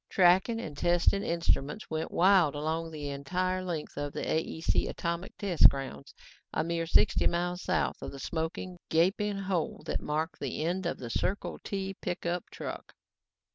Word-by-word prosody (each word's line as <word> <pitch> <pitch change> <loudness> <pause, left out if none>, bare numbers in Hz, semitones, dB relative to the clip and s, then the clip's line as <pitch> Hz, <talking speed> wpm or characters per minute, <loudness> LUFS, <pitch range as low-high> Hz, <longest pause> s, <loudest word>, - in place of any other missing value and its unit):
Tracking 190 +5 +4
and 155 -10 -6
testing 175 +5 +3
instruments 165 -1 0
went 160 0 -2
wild 180 -5 +5
along 160 +2 -2
the 150 -2 -5
entire 185 +7 -1
length 165 -6 -4
of 145 0 -3
the - - -3
AEC 160 0 0
atomic 170 +2 -3
test 190 -5 +6
grounds, 135 - -7 0.4
a - - 0
mere 165 0 -1
sixty 205 - +4
miles 175 +1 -1
south 185 - 0
of - - -5
the 140 - -8
smoking, 165 +5 -4
gaping 195 +5 +2
hole 190 -4 -2
that - - -2
marked 155 +3 -2
the 140 +2 -3
end 175 +2 -1
of - - -2
the 120 -2 -6
Circle 195 +10 -2
T 195 -1 -3
pickup 175 -1 -2
truck. - - -7
170 Hz, 160 wpm, -30 LUFS, 155-185 Hz, 0.4 s, test